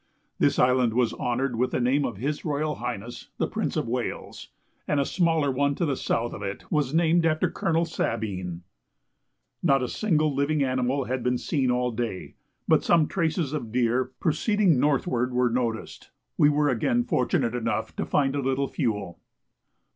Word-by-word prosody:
This - - +3
island 125 -2 +3
was 120 -2 +2
honoured 125 +1 -1
with 125 +2 +1
the - - -1
name 130 +4 +2
of 115 - -4
His 145 +7 -3
Royal 150 0 -1
Highness 120 -1 -6
the - - +1
Prince - - -2
of - - -1
Wales, - - -4 0.4
and 150 - +1
a 140 - +2
smaller 165 -5 +1
one 140 +2 +1
to 170 - 0
the 140 -3 0
south 120 -1 -1
of - - -7
it 100 0 -5
was 150 -4 +1
named 165 +1 +3
after 155 -1 +1
Colonel 165 0 0
Sabine. 95 - -3 1.0
Not 135 -6 +3
a - - -1
single 155 - +1
living 140 +2 +1
animal 130 +1 0
had 130 0 -3
been 125 0 +1
seen 135 -1 0
all 125 0 +1
day, 115 -5 -4 0.3
but - - +4
some 165 -3 +4
traces 165 -4 -1
of 120 -8 -4
deer 125 +1 +2
proceeding 185 - +2
northward 130 -3 +1
were 125 -1 +2
noticed. 115 -2 -3 0.3
We 145 - +5
were 150 0 +2
again 120 -1 +1
fortunate 120 -1 0
enough 115 -2 -2
to - - 0
find 135 -1 +1
a 140 - 0
little 135 +1 0
fuel. 105 -7 -2
130 Hz, 175 wpm, -26 LUFS, 120-150 Hz, 1.0 s, We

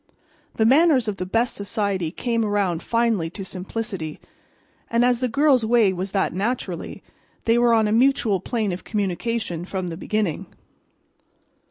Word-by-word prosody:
The 220 - +2
manners 270 -1 +4
of 205 -2 -2
the 185 - -4
best 230 +5 +1
society 200 -4 -1
come 230 +6 -1
around 200 -5 0
finally 230 -8 0
to 195 +3 -7
simplicity; 190 -3 -5 0.7
and 235 +1 +3
as 245 -1 +2
the 255 - 0
girl's 270 0 +3
way 220 -3 +3
was 185 +2 -4
that 195 -3 0
naturally, 195 -3 -3 0.4
they 230 +1 +3
were 240 -1 +4
on 220 -1 +3
a - - -1
mutual 230 -4 +3
plane 220 0 -2
of 180 - -5
communication 205 -2 -2
from 185 -1 -4
the 165 - -6
beginning. 205 -4 -2
215 Hz, 155 wpm, -23 LUFS, 185-235 Hz, 0.7 s, manners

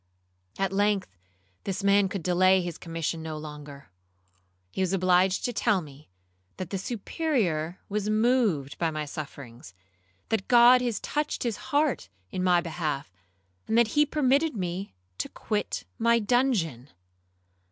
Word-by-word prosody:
At 195 -1 -1
length 200 - +1 0.5
this 195 0 -3
man 200 -1 +4
could 195 -3 -4
delay 185 +2 +4
his 175 -1 -6
commission 165 0 -3
no 160 -1 -5
longer. 150 -4 -10 0.8
He - - -3
was 185 0 +1
obliged 185 0 +3
to 245 - -1
tell 215 -2 +2
me 145 - -12 0.5
that 185 -1 -6
the 195 - -2
Superior 195 - -1
was 210 0 -2
moved 215 - +1
by 165 - +1
my 155 -1 -3
sufferings, 135 - -9 0.5
that 215 -4 -1
God 245 +1 +7
had 240 -3 -1
touched 300 0 -2
his 235 -3 -1
heart 290 - +1 0.2
in 185 - -2
my 180 -1 +4
behalf, 155 - -4 0.5
and 220 - +1
that 235 -2 +4
he 295 +6 +4
permitted 290 0 +2
me 185 - -4 0.2
to - - -2
quit 210 -2 -3
my 235 +1 +4
dungeon. 210 - 0
190 Hz, 140 wpm, -27 LUFS, 160-230 Hz, 0.8 s, God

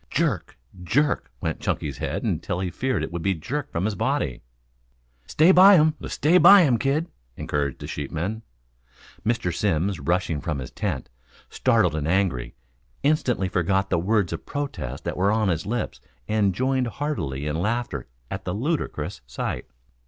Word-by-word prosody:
Jerk, 135 - -1 0.2
jerk, 135 - +1
went - - -2
Chunky's 70 -3 -2
head - - -3
until 85 - -1
he 90 -2 -2
feared 125 -8 -1
it 80 - -4
would 85 -1 -4
be 95 +2 +1
jerked 135 - -4
from 85 +3 -1
his 110 - 0
body. 65 -9 -1 0.9
"Stay 160 +4 +5
by 190 +2 +8
him, 155 -2 +5
stay 170 +5 +3
by 200 0 +9
him, 125 -7 +3
kid," 140 +6 +1 0.3
encouraged 70 -2 -2
a - - -4
sheepman. 85 +9 -4 0.8
Mr. 110 -7 0
Simms 95 -1 0
rushing 85 -4 0
from 75 0 -2
his 65 -2 -6
tent, 95 - -3 0.4
startled 110 -10 +2
and 75 -1 -2
angry, 85 -10 0 0.5
instantly 130 -9 +1
forgot 95 +2 0
the - - +3
words 100 -1 +1
of 80 - -5
protest 95 - -5
that - - -3
were 100 +3 +3
on 110 -2 +2
his 80 0 -1
lips 120 +1 -3 0.3
and 105 -4 +1
joined 130 +2 +1
heartily 90 - -3
in 75 +1 -1
laughter 105 - -2 0.2
at - - -4
the 90 - -3
ludicrous 145 - -2
sight. - - -4
100 Hz, 160 wpm, -24 LUFS, 80-130 Hz, 0.9 s, by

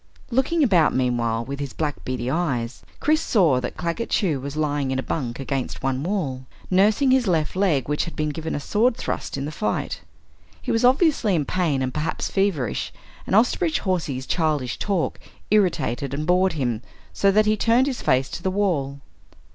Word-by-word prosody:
Looking 280 +7 +2
about 180 - +4
meanwhile 120 -3 0
with 140 +2 -6
his 140 -2 -4
black 150 -3 -3
beady 125 -1 -3
eyes, 135 -7 -1 0.2
Chris 310 +1 +2
saw 165 - +3
that 125 - -5
Claggett 170 +7 -3
Chew 165 -10 +1
was 140 +2 -6
lying 145 -3 0
in 130 - -1
a 130 - -2
bunk 125 -6 -3
against 135 -1 -3
one 135 0 0
wall, 145 -8 -2 0.2
nursing 210 +8 +4
his 260 -3 +3
left 160 -3 0
leg 175 -10 +1
which 150 0 0
had 170 - -8
been 155 0 -1
given 160 +1 -4
a - - -2
sword 230 - +1
thrust - - -3
in 135 - -3
the 150 - -4
fight. 210 +7 -2 0.6
He - - -3
was 225 +1 +1
obviously 255 - +3
in 150 -4 0
pain 155 -7 0
and 130 0 -2
perhaps 155 +1 -2
feverish, 190 - 0 0.4
and - - +1
Osterbridge 305 - +2
Hawsey's 160 -9 -2
childish 150 -7 -1
talk 195 -5 -1 0.3
irritated 140 - +1
and 150 +2 -3
bored 180 +2 +3
him 120 -7 -1 0.3
so 200 - +3
that 215 +2 +4
he 215 0 +3
turned 230 +4 +3
his 270 -3 -3
face 130 +1 +2
to - - -5
the 190 - 0
wall. 160 -9 -1
160 Hz, 185 wpm, -23 LUFS, 135-205 Hz, 0.6 s, about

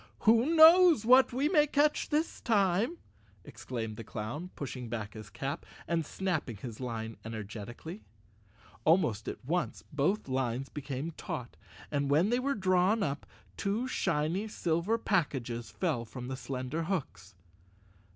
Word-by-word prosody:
"Who 235 +9 +4
knows 330 - +8
what 255 +3 +7
we 265 +4 +1
may 300 -3 +4
catch 295 +1 +2
this 310 +2 -1
time?" 205 - +2 0.5
exclaimed 115 -4 -5
the 115 - -6
clown, 115 +12 -5
pushing 125 -4 -6
back 110 -3 -4
his 110 -2 -9
cap, 135 - -4 0.2
and 170 -1 +1
snapping 155 - -2
his 115 +1 -8
line 115 -3 -4
energetically. 110 - -7 0.8
Almost 140 - +2
at - - -6
once 175 +5 -1
both 150 +8 +1
lines 130 0 -1
became 145 +2 -4
taut, 125 -5 -6 0.4
and 140 -1 0
when 165 +9 +3
they 245 - +3
were 280 +2 0
drawn 190 +2 +2
up, 140 -4 -3 0.3
two 210 +6 -1
shiny 170 -2 0
silver 175 +2 0
packages 130 - -1
fell 155 -11 -1
from 125 +2 -8
the 130 - -3
slender 130 +4 -4
hooks. 105 - -4
155 Hz, 140 wpm, -31 LUFS, -, 0.8 s, knows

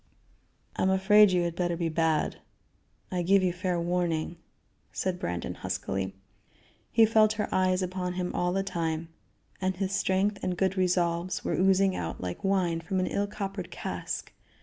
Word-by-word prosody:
"I - - -1
am 190 - +3
afraid 200 +2 +6
you 180 -1 +2
had 170 -1 -2
better 175 -1 -1
be 170 -1 0
bad 160 -1 +1 0.7
I 180 -1 0
give 190 +2 +4
you 180 -2 +1
fair 180 -1 -1
warning," 170 -1 -1 0.5
said 185 -1 -2
Brandon 90 0 -3
huskily. 95 +1 -3 0.8
He 225 -1 +6
felt 215 -1 +4
her 210 -1 -2
eyes 185 0 +2
upon 180 0 -3
him 180 0 -3
all 180 0 0
the 195 +1 0
time, 165 -3 -2 0.5
and 185 0 0
his 190 +1 -2
strength 195 +2 +1
and 180 -1 -1
good 190 0 +1
resolves 180 -1 0
were - - 0
oozing 190 +1 +3
out 80 -1 -4
like 90 -1 -5
wine 185 -4 +1
from 185 +3 -2
an 185 - +1
ill 200 +2 -1
coppered 195 -3 -5
cask. - - -5
180 Hz, 170 wpm, -28 LUFS, 170-190 Hz, 0.8 s, afraid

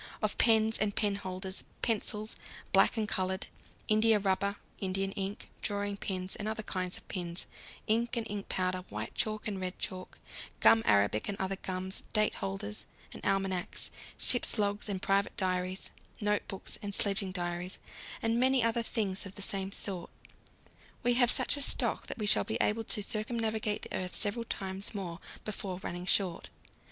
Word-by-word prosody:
Of 215 -1 0
pens 220 -1 +5
and 205 -1 +1
penholders, 190 -2 -1 0.2
pencils, 215 -1 0 0.4
black - - +5
and 215 -1 +1
coloured, 190 -1 0 0.4
india 215 +1 +5
rubber, 200 0 +1 0.2
Indian 195 0 -1
ink, 195 0 -4
drawing 205 -1 -1
pins 185 -1 -2
and 210 - -4
other 220 0 -2
kinds 185 -2 -3
of - - -14
pins, 175 -1 -1 0.4
ink 230 +2 +1
and 230 - 0
ink 205 -1 -5
powder, 185 0 0
white 105 +1 -5
chalk 215 0 -1
and 200 -3 -3
red 185 0 -3
chalk, 185 -3 -5 0.4
gum 225 - +7
arabic 100 - +3
and 200 - -2
other 190 0 0
gums, 185 0 -3
date 215 -1 +4
holders 100 +1 -4 0.3
and - - -9
almanacs, 195 -2 -1 0.3
ship's 245 -1 +2
logs 205 0 0
and 195 -2 -2
private 195 0 +2
diaries, 185 0 -1 0.3
notebooks 205 -2 -1
and 200 -1 -2
sledging 195 -1 +3
diaries, 175 0 -3 0.5
and 230 +1 +2
many 260 -1 +4
other 230 +1 +3
things 205 -4 0
of 195 - -12
the 200 - -6
same 195 -1 -2
sort, 190 -3 -3 0.9
we 245 0 +4
have 245 -1 +4
such - - +6
a - - +2
stock - - +4
that - - -4
we 215 - -2
shall 205 - +5
be 220 - -2
able 225 +2 +2
to 210 -1 +3
circumnavigate 220 0 0
the - - -5
earth 180 -1 -3
several 220 +3 +1
times 195 -1 -5
more 175 -4 -4 0.3
before 195 -3 -4
running 175 +1 -4
short. 175 - +1
200 Hz, 165 wpm, -32 LUFS, 185-215 Hz, 0.9 s, gum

